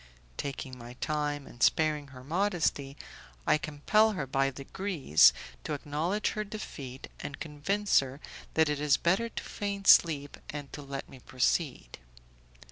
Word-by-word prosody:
Taking 135 -2 -5
my 120 +1 -9
time, 145 +1 -2
and 120 - -14
sparing 150 0 +3
her 130 -2 -12
modesty, 160 -4 0 0.5
I 155 - +4
compel 210 +10 +2
her 150 -8 -3
by 135 +1 +1
degrees 140 - +3 0.3
to 155 - -3
acknowledge 155 +8 -1
her 215 - -2
defeat, 145 - -7
and 140 - -6
convince 180 +7 +1
her 135 0 -5 0.4
that 160 0 +4
it 150 -1 -1
is 145 -1 +4
better 195 +7 +1
to - - -6
feign 200 -1 -4
sleep 145 -7 +5
and 145 -2 -7
to 145 - -6
let 140 -1 -6
me 130 - -13
proceed. 130 - -1
150 Hz, 145 wpm, -30 LUFS, 135-175 Hz, 0.5 s, sleep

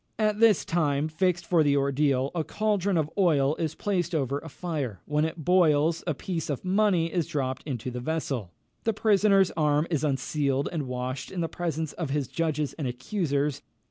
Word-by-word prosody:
At 215 -1 +1
the 230 -1 +8
time 150 -3 +1
fixed 175 +1 0
for 170 -2 +3
the 145 -2 +3
ordeal, 140 -1 +1
a 165 -3 -1
caldron 200 -1 0
of 155 -1 0
oil 150 -6 +3
is 160 -2 -2
placed 180 -4 -1
over 140 -1 0
a 160 - -10
fire; 140 - -4
when 150 +1 +1
it 160 -1 -5
boils, 165 -3 +3
a 160 - 0
piece 165 +1 -4
of 145 +4 -3
money 185 -4 +2
is 175 -4 0
dropped 130 -3 -2
into 125 -2 -4
the 125 - -4
vessel; 135 - -3 0.3
the 225 - +1
prisoner's 200 -3 +4
arm 150 -1 +2
is 155 -2 0
unsealed 140 0 0
and 155 -6 -3
washed 125 +1 -4
in 185 -2 -4
the 165 - 0
presence 160 -3 -3
of 165 -5 -4
his 140 -2 -1
judges 155 -2 -1
and 140 - -1
accusers. 145 - -1
155 Hz, 185 wpm, -27 LUFS, 140-175 Hz, 0.3 s, the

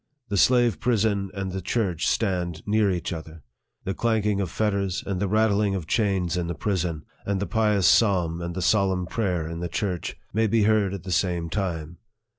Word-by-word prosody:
The 100 - -1
slave 120 0 +4
prison 105 -5 +1
and 95 -1 -3
the 95 +1 -4
church 90 -3 -1
stand 90 -6 -1
near 105 0 +2
each 90 0 -2
other. 80 -1 -9 0.4
The 95 - -2
clanking 105 -2 +1
of 95 - -2
fetters 100 -2 -1
and 95 -2 -2
the 100 - 0
rattling 105 -1 +2
of 90 -4 -4
chains 95 -4 0
in 85 -1 -1
the 85 - -3
prison, 90 -6 -2 0.2
and 100 -1 -1
the 100 - -1
pious 105 -4 +1
psalm 90 -6 +3
and 85 +1 -3
solemn 95 -1 +2
prayer 90 -5 -1
in 85 0 -5
the 85 0 -3
church, 90 -1 -3 0.2
may 110 +2 +2
be 110 +1 +2
heard 105 -2 +2
at 95 - -8
the 95 - -6
same 85 -3 0
time. 85 -5 -3
95 Hz, 190 wpm, -25 LUFS, 85-105 Hz, 0.4 s, slave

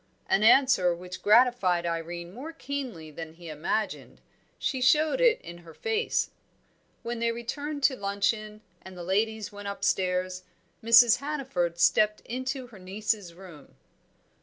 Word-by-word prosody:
An 195 - +2
answer 220 -7 +5
which 180 +1 -9
gratified 210 -6 +4
Irene 170 +1 -4
more 285 +9 -8
keenly 260 - -6
than 160 +1 -8
he 170 0 -11
imagined; 170 +8 -3 0.4
she 260 -3 -2
showed 310 - +3
it 485 -3 +4
in 170 0 -10
her 165 -2 -15
face. 450 0 -1 0.7
When 235 0 -4
they 230 0 +1
returned 285 +5 -5
to 270 - +4
luncheon, 210 +1 -2 0.2
and 190 -1 -12
the 175 - -7
ladies 210 +3 -1
went 205 0 -8
upstairs, 185 -2 -1 0.4
Mrs. 230 0 +7
Hannaford 270 - -2
stepped 210 +4 +3
into 260 +2 -4
her 230 -5 -14
niece's 200 -1 -3
room. 175 -6 -14
210 Hz, 135 wpm, -27 LUFS, 180-250 Hz, 0.7 s, Mrs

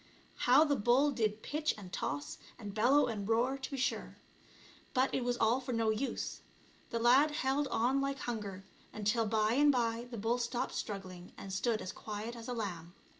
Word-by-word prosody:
How 260 +5 +8
the 290 -2 +2
bull 255 +6 +3
did 220 -4 -1
pitch 305 +1 -1
and 185 -3 -10
toss, 145 0 -3 0.2
and 205 -4 -7
bellow 250 +7 +4
and 210 -3 -4
roar, 240 +4 +2
to 265 - -5
be 275 - -4
sure, 260 - -2 0.8
but 260 +1 +2
it 255 - 0
was 245 0 0
all 230 +3 +3
for 255 -1 -4
no 225 -1 +2
use, 240 +5 -3 0.5
the 235 - -2
lad 250 +6 +5
held 285 -1 0
on 260 +4 +1
like 275 0 -1
hunger, 210 -7 -5 0.3
until 215 +2 0
by 215 +1 +2
and 290 +3 +5
by 235 -2 0
the 235 - -6
bull 230 +4 0
stopped 240 0 -2
struggling 185 -3 -6
and 195 - -7
stood 220 +3 0
as 185 - -4
quiet 215 +2 -6
as 230 -1 -9
a 250 - -2
lamb. 180 -6 -5
235 Hz, 190 wpm, -33 LUFS, 210-260 Hz, 0.8 s, How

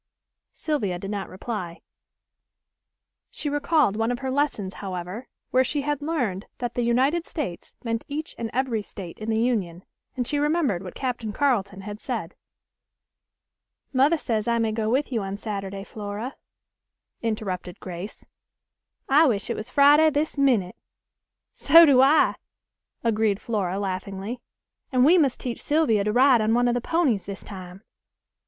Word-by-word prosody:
Sylvia 215 - -2
did 195 +3 -6
not 200 -2 -4
reply. 185 -3 -6 1.5
She 295 - -4
recalled 290 -6 +2
one 225 +2 0
of 245 - -1
her 265 +1 -3
lessons, 260 -9 -1
however, 185 +5 -5 0.2
where 260 +1 +4
she 290 +2 -1
had 295 0 -1
learned 250 - -2
that 245 -1 -3
the 245 - -1
United 265 +8 +2
States 255 - -5
meant 230 -1 -2
each 305 +2 -5
and 230 -1 -3
every 250 -4 0
State 190 -3 -9
in 215 +1 -5
the 220 0 +1
Union 195 -8 -1 0.3
and 245 -2 -1
she 290 - 0
remembered 295 - +1
what 185 -2 -9
Captain 245 -5 -3
Carleton 205 -6 0
had 205 +1 -7
said. 215 -9 -4 1.6
"Mother 280 +6 +4
says 220 -7 -2
I 235 0 +2
may 225 -1 +1
go 215 0 -1
with 270 +4 +1
you 230 -3 0
on 195 0 -4
Saturday, 195 -2 -5
Flora," 210 +4 -6 0.9
interrupted 195 -5 -3
Grace; 180 +3 -8 0.8
"I 300 +4 +6
wish 205 -6 0
it - - -1
was 215 +4 -6
Friday 290 +3 +6
this 300 +1 -1
minute." 245 -10 +2 0.8
"So 330 +4 +7
do 270 -4 +6
I," 280 +4 +4 0.7
agreed 220 -3 +1
Flora 195 -5 -2
laughingly; 195 +4 -4 0.5
"and 255 -1 +4
we 350 +5 +6
must 275 -5 +2
teach 245 -2 -4
Sylvia 290 -9 +2
to 210 - +1
ride 250 0 +5
on 220 +1 +2
one 245 0 +3
of 240 - +2
the 245 - -1
ponies 270 - +1
this 200 -1 -6
time." 185 0 -9
230 Hz, 155 wpm, -25 LUFS, 200-275 Hz, 1.6 s, So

